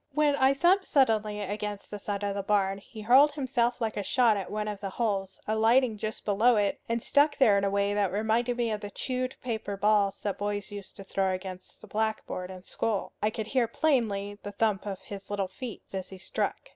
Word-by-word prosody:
When 300 -1 +3
I 265 +1 +4
thumped 365 +6 +3
suddenly 215 -6 +2
against 205 0 -4
the 205 - -5
side 200 0 -3
of 200 -1 0
the 200 - -2
barn, 195 -1 +1
he 215 +2 -11
hurled 265 +7 +6
himself 250 -4 0
like 225 -2 -1
a - - 0
shot 235 +1 +3
at 195 -2 -4
one 210 0 -2
of 210 -2 -4
the 195 -1 -4
holes, 195 -3 -2
alighting 225 +1 +3
just 215 +1 -5
below 220 +4 +4
it, 205 -2 +1
and 230 0 -1
stuck 290 0 +3
there 225 -7 +5
in 200 - +2
a 200 - +2
way 200 0 +1
that 205 -3 +1
reminded 225 +4 +1
me 235 -2 0
of 210 -1 -3
the 205 - -5
chewed 255 +4 -3
paper 220 -4 -3
balls 200 -1 +2
that 200 -2 -3
boys 205 -1 -3
used 205 -2 -9
to 195 - -9
throw 190 -1 0
against 185 0 -8
the 215 - -12
blackboard 215 -4 -2
in 185 -1 -9
school. 210 0 -2
I 215 - +3
could 215 0 -4
hear 245 +1 +1
plainly 215 -8 0
the 205 - -7
thump 210 -1 0
of 195 -2 -4
his 200 -1 -9
little 200 -2 -1
feet 225 +4 -7
as 190 -1 -4
he 190 - -9
struck. 190 - -3
210 Hz, 220 wpm, -28 LUFS, 200-235 Hz, -, hurled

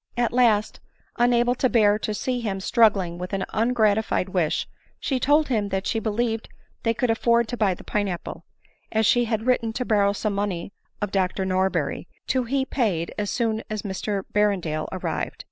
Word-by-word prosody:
At 240 -1 +1
last, 225 -4 +2 0.4
unable 240 0 +3
to 255 +1 +1
bear 210 -3 +4
to 215 - -2
see 250 +3 -2
him 200 -4 -2
struggling 195 -5 +2
with 180 +2 -6
an 195 -1 -1
ungratified 220 -4 +1
wish, 175 -5 0 0.3
she 265 -3 -1
told 295 +4 +3
him 215 -5 0
that 190 0 -2
she 225 - 0
believed 225 +1 -1 0.3
they 230 -1 0
could 240 0 +1
afford 235 0 +2
to 245 - -2
buy 205 -5 +1
the - - -13
pine 205 -1 -1
apple, 175 -3 -6 0.5
as 220 0 +2
she 240 +3 +4
had 220 -1 -2
written 240 -3 +1
to 250 +2 -2
borrow 205 -3 +3
some 210 +1 -2
money 195 -2 -3 0.3
01 205 - -1
Dr 190 0 0
Norberry, 190 0 0 0.2
to 260 -2 +1
he 265 +2 0
paid 205 - -1
as 205 -1 -1
soon 225 -2 0
as 215 -1 -3
Mr 200 0 -3
Berrendale 185 -7 +1
arrived. - - -3
215 Hz, 180 wpm, -24 LUFS, 195-240 Hz, 0.5 s, bear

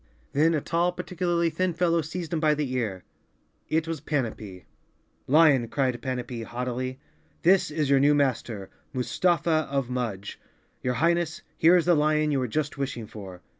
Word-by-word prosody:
Then 160 +3 +3
a 150 - 0
tall, 170 +3 +1
particularly 175 -1 -1
thin 185 -1 -1
fellow 170 -1 +2
seized 160 +2 -5
him 165 - +1
by 155 -1 +3
the 145 -4 -2
ear. 105 -8 -2 0.7
It 160 +1 +1
was 165 -3 -4
Panapee. 110 -10 -3 0.6
"lion," 145 -4 +5
cried 130 -1 -1
Panapee 125 -2 -4
haughtily, 125 +2 -4 0.4
"this 190 +2 +4
is 155 -1 -1
your 135 - +5
new 145 +2 +4
master, 115 -8 -1 0.2
Mustafa 155 +5 +1
of 135 -3 -1
Mudge. 110 -6 -4 0.4
Your 125 0 -1
Highness, 170 +3 +1
here 170 +3 +5
is 175 - +3
the 175 - +5
lion 155 0 +2
you 140 - +1
were 130 - -1
just 145 +3 -2
wishing 130 -4 -3
for!" 95 -4 -10
145 Hz, 165 wpm, -26 LUFS, 125-165 Hz, 0.7 s, lion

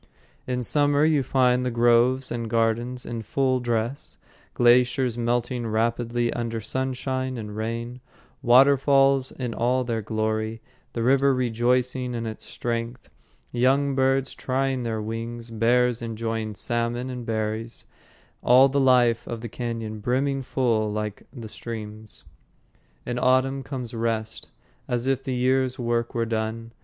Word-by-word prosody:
In 125 -1 -1
summer 145 +3 +3
you 155 -3 +3
find 125 -1 +2
the 125 - 0
groves 120 +2 +3
and 115 -1 -3
gardens 115 +2 0
in 115 -1 -4
full 130 +3 0
dress; 120 +2 -3 0.4
glaciers 125 0 +3
melting 120 0 -1
rapidly 115 +2 0
under 115 -1 -3
sunshine 130 +2 -2
and 105 -2 -6
rain; 115 +3 -4 0.4
waterfalls 135 +1 +4
in 125 -3 -4
all 125 +3 +1
their 115 -2 -2
glory; 110 +1 -2 0.3
the 115 - -2
river 135 +2 +4
rejoicing 125 +1 0
in 115 0 -3
its 110 -1 -7
strength; 115 0 -4 0.4
young 135 +3 +2
birds 135 0 +1
trying 135 0 -1
their 110 -2 -3
wings; 115 +1 -5
bears 120 +2 +2
enjoying 115 -1 -3
salmon 120 +2 -1
and 125 -2 -7
berries; 110 +1 -3 0.6
all 130 +2 +6
the 140 +1 0
life 125 -3 +3
of 115 -1 -5
the 120 - -6
cañon 115 -2 -5
brimming 135 +4 0
full 115 -5 0
like 105 -1 -5
the 120 -5 -8
streams. 110 -1 -8 0.8
In 120 0 -2
autumn 130 +2 +2
comes 125 -4 -6
rest, 115 -1 -3 0.4
as 120 0 -1
if 135 0 0
the 130 - -2
year's 130 +1 +1
work 120 -1 -1
were 115 -1 +1
done. 115 0 -3
120 Hz, 135 wpm, -25 LUFS, 115-130 Hz, 0.8 s, all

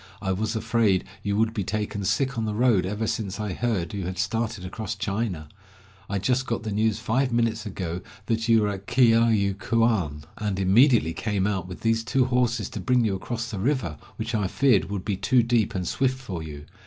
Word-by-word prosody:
"I 95 - -2
was 110 +4 -1
afraid 110 -4 +2 0.2
you 100 0 -1
would 110 0 +2
be 105 -4 -2
taken 105 +1 -3
sick 135 +5 +1
on 115 -1 -1
the 105 -1 -2
road 110 -6 +3
ever 105 +3 -2
since 105 -2 -3
I 105 -3 -2
heard 100 -7 -1
you 100 -3 -3
had 90 +1 -4
started 110 +1 -2
across 105 +3 -4
China. 100 -5 -2 0.6
I 100 - -1
just 125 +7 0
got 115 -2 -2
the 110 - -3
news 110 0 +1
five 130 +3 0
minutes 115 -2 0
ago 90 -3 -4 0.2
that 115 +1 -1
you 115 -2 +5
were 105 - +1
at 100 -1 -6
Kiayu 115 -5 +4
kuan, 105 -11 +1 0.2
and 105 -2 -2
immediately 100 - +4
came 100 -2 -1
out 95 -4 -1
with 90 - -9
these 115 0 +1
two 125 +2 +2
horses 125 -2 +1
to - - -6
bring 125 -2 +2
you 105 - +1
across 120 +4 -4
the 105 - -4
river, 120 - 0 0.2
which 110 +2 -4
I 105 -3 +1
feared 125 0 +3
would 100 -2 -5
be 100 -3 -1
too 125 +3 +3
deep 115 -3 +1
and 90 -2 -2
swift 130 -1 0
for 95 -11 -5
you. 75 -2 -8
110 Hz, 210 wpm, -25 LUFS, 95-115 Hz, 0.6 s, you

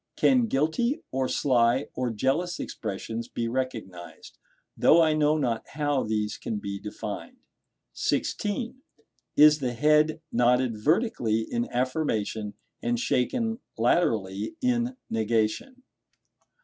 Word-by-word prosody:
Can 250 -3 +4
guilty, 225 - 0
or 130 0 0
sly, 125 0 +2
or 125 -1 -1
jealous 135 +11 -1
expressions 115 +1 -5
be 115 -1 -3
recognized? 115 -8 -5 0.4
though 165 - +5
I 160 -2 +4
know 155 0 +3
not 120 -6 -1
how 145 -3 +1
these 105 -1 -2
can 110 - -3
be 100 -1 -5
defined. 105 - -7 0.6
(16.) 235 +4 -2 0.6
Is 150 0 +7
the 125 -3 -2
head 150 +5 +3
nodded 125 0 +2
vertically 150 - +1
in 235 - -3
affirmation, 115 -5 -1 0.3
and 120 0 0
shaken 225 - 0 0.2
laterally 110 - +1
in 250 0 0
negation? 115 - -1
130 Hz, 110 wpm, -27 LUFS, 115-170 Hz, 0.6 s, Is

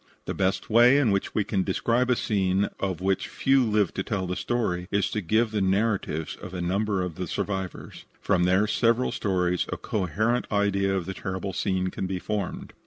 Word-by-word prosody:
The - - -3
best 95 0 0
way 120 +4 +6
in 130 -7 +3
which 100 0 -1
we 105 - +2
can 100 -1 -1
describe 115 +6 +1
a 125 - +4
scene 100 -3 +1
of 95 -3 -2
which 95 0 0
few 135 -1 +2
lived 105 -5 +1
to - - 0
tell 95 -5 -2
the 90 0 -3
story, 90 -8 -1
is 100 0 0
to 105 - -1
give 110 +5 +1
the 105 -2 -1
narratives 95 -5 0
of 95 - -9
a - - -3
number 95 +2 0
of 90 -3 -5
the 90 -1 -3
survivors. 95 +1 -4
From 90 -3 +2
their 95 +3 +3
several 115 +3 +2
stories 90 -3 0
a - - -2
coherent 110 +5 -1
idea 100 -1 +1
of 90 - -3
the 95 - -4
terrible 95 0 -4
scene 95 -2 0
can 95 - -4
be 95 0 -2
formed. 100 0 -4
100 Hz, 200 wpm, -26 LUFS, 95-110 Hz, -, way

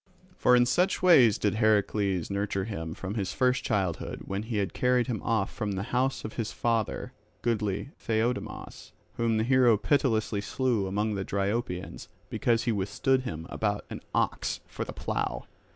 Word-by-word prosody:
For 125 - +4
in 120 0 +5
such 180 +11 +1
ways 130 - +7
did 105 - +1
Heracles 105 -4 +1
nurture 100 -1 -1
him 80 -7 -5
from 95 +1 -5
his 100 -5 -2
first 125 0 +2
childhood 95 - -1
when 100 +1 -3
he 110 0 -3
had 100 -2 -1
carried 125 -1 +2
him 120 -4 -3
off 110 -4 0
from 105 -3 -2
the 95 0 -2
house 130 +2 +1
of 110 - -5
his 115 -3 -2
father, 115 -3 -1 0.3
goodly 110 +1 -1
Theiodamas, 115 +2 -3 0.2
whom 115 -1 +1
the 110 - +2
hero 125 -2 +5
pitilessly 110 -5 +1
slew 115 -2 0
among 105 +3 0
the 95 -2 -2
Dryopians 100 -1 -2 0.2
because 115 -1 +1
he 120 - +1
withstood 105 +6 +1
him 80 -11 -5
about 105 -1 -1
an - - -6
ox - - 0
for - - -5
the - - -6
plough. - - -3
110 Hz, 170 wpm, -28 LUFS, 100-120 Hz, 0.3 s, ways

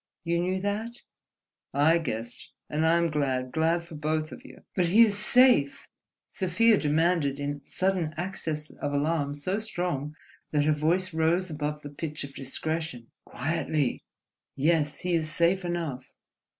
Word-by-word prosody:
You 170 0 0
knew 185 +1 0
that?" 215 +4 -3 0.7
"I 160 +4 +5
guessed, 120 -6 -6 0.2
and 155 +2 +1
I 165 +1 +4
am 170 -1 +1
glad, 130 -4 -1
glad 165 +2 +1
for 170 - -12
both 155 +1 -2
of 250 - -10
you." 280 - -14
"But 180 -3 +2
he 210 +7 +7
is 210 -3 +2
safe?" 225 - +4 0.4
Sofia 205 +4 +3
demanded 150 -2 +1
in 145 0 -3
sudden 185 -4 0
access 160 -4 -3
of 145 0 -4
alarm 145 0 0
so 185 +8 -1
strong 175 -9 -3 0.3
that 150 -1 +2
her 155 - +4
voice 170 +5 +1
rose 165 +3 +1
above 150 0 -3
the 145 - -7
pitch 150 +1 -5
of 140 0 -8
discretion. 140 -2 -3
"Quietly. 155 0 -1 0.5
Yes, 150 +1 +1
he 180 0 -1
is 160 -2 +1
safe 175 +4 +2
enough." 165 -7 -3
160 Hz, 150 wpm, -27 LUFS, 145-180 Hz, 0.7 s, he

